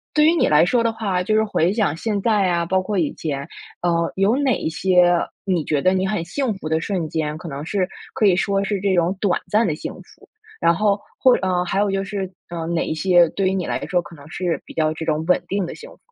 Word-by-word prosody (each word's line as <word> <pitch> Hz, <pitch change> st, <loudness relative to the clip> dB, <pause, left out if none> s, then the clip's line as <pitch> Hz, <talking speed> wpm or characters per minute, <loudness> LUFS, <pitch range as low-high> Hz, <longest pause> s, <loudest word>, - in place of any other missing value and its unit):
对 300 Hz, 0 st, +5 dB
于 320 Hz, -, +5 dB
你 -, -, +3 dB
来 150 Hz, +2 st, +5 dB
说 235 Hz, +6 st, +2 dB
的 230 Hz, -, +2 dB
话， 200 Hz, -5 st, -1 dB
就 215 Hz, +4 st, 0 dB
是 220 Hz, -, +4 dB
回 185 Hz, -5 st, +1 dB
想 210 Hz, -9 st, +1 dB
现 205 Hz, +4 st, -2 dB
在 210 Hz, -2 st, +2 dB
呀， 170 Hz, -1 st, +1 dB
包 185 Hz, +2 st, +1 dB
括 205 Hz, +2 st, -3 dB
以 160 Hz, -5 st, 0 dB
前， 140 Hz, -2 st, -4 dB, 0.3 s
呃， 170 Hz, -1 st, +1 dB
有 195 Hz, +5 st, +2 dB
哪 270 Hz, -3 st, +1 dB
一 -, -, -3 dB
些 180 Hz, +1 st, +3 dB, 0.3 s
你 180 Hz, -5 st, 0 dB
觉 150 Hz, -1 st, 0 dB
得 185 Hz, +4 st, +3 dB
你 190 Hz, 0 st, 0 dB
很 190 Hz, -4 st, -2 dB
幸 255 Hz, +7 st, -2 dB
福 190 Hz, -, -7 dB
的 160 Hz, 0 st, +1 dB
瞬 180 Hz, -3 st, -2 dB
间？ 155 Hz, -1 st, -2 dB
可 170 Hz, -, -9 dB
能 140 Hz, -1 st, -6 dB
是 185 Hz, +2 st, -1 dB, 0.3 s
可 215 Hz, -, +2 dB
以 190 Hz, -3 st, +5 dB
说 195 Hz, +2 st, 0 dB
是 200 Hz, 0 st, -1 dB
这 195 Hz, -1 st, +1 dB
种 175 Hz, +2 st, +1 dB
短 195 Hz, -4 st, +1 dB
暂 220 Hz, +2 st, +3 dB
的 155 Hz, -, -1 dB
幸 -, -, -6 dB
福？ -, -, -17 dB, 0.3 s
然 170 Hz, -, +4 dB
后， 205 Hz, +1 st, +1 dB, 0.2 s
或 255 Hz, -, +6 dB
呃， 180 Hz, -1 st, +1 dB
还 185 Hz, -, -1 dB
有 205 Hz, -1 st, +1 dB
就 195 Hz, 0 st, -1 dB
是 195 Hz, -1 st, -4 dB, 0.2 s
呃， 170 Hz, -1 st, -4 dB
哪 170 Hz, 0 st, -1 dB
一 -, -, -2 dB
些 175 Hz, 0 st, +4 dB
对 195 Hz, +2 st, -1 dB
于 190 Hz, -, +1 dB
你 185 Hz, -3 st, -2 dB
来 -, -, -2 dB
说 180 Hz, -1 st, +1 dB
可 170 Hz, -, -13 dB
能 145 Hz, -1 st, -14 dB
是 175 Hz, +1 st, -2 dB
比 -, -, -12 dB
较 155 Hz, -1 st, +1 dB
这 160 Hz, +1 st, -5 dB
种 155 Hz, -1 st, 0 dB
稳 180 Hz, -, +2 dB
定 195 Hz, -2 st, -1 dB
的 -, -, -7 dB
幸 475 Hz, -, -11 dB
福？ -, -, -18 dB
185 Hz, 285 characters per minute, -21 LUFS, 165-200 Hz, 0.3 s, 或